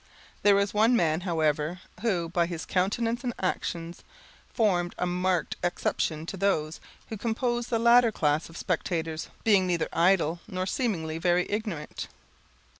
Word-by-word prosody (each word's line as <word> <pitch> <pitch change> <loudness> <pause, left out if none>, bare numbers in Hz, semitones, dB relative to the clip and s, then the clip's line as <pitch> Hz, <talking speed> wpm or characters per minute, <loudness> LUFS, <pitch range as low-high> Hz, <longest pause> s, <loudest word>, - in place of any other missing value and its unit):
There 205 -1 +5
was 200 0 +1
one 220 +4 +4
man, 165 -5 +2
however, 160 -1 0 0.2
who, 185 -7 0
by 170 0 +1
his 165 -4 -5
countenance 230 - 0
and 245 -2 -2
actions, 170 -2 -3 0.5
formed 180 -6 +1
a - - 0
marked 180 -1 0
exception 160 -2 -1
to 195 - -6
those 170 -5 0 0.3
who 220 - -5
composed 240 +2 -1
the 230 - +1
latter 235 0 +5
class 150 -4 0
of 165 - -11
spectators, 165 -2 -2
being 200 -4 +4
neither 175 -2 0
idle, 170 -1 +3
nor 185 0 -3
seemingly 170 -8 -2
very 175 +1 +2
ignorant. 205 -8 -4
180 Hz, 145 wpm, -27 LUFS, 165-210 Hz, 0.5 s, There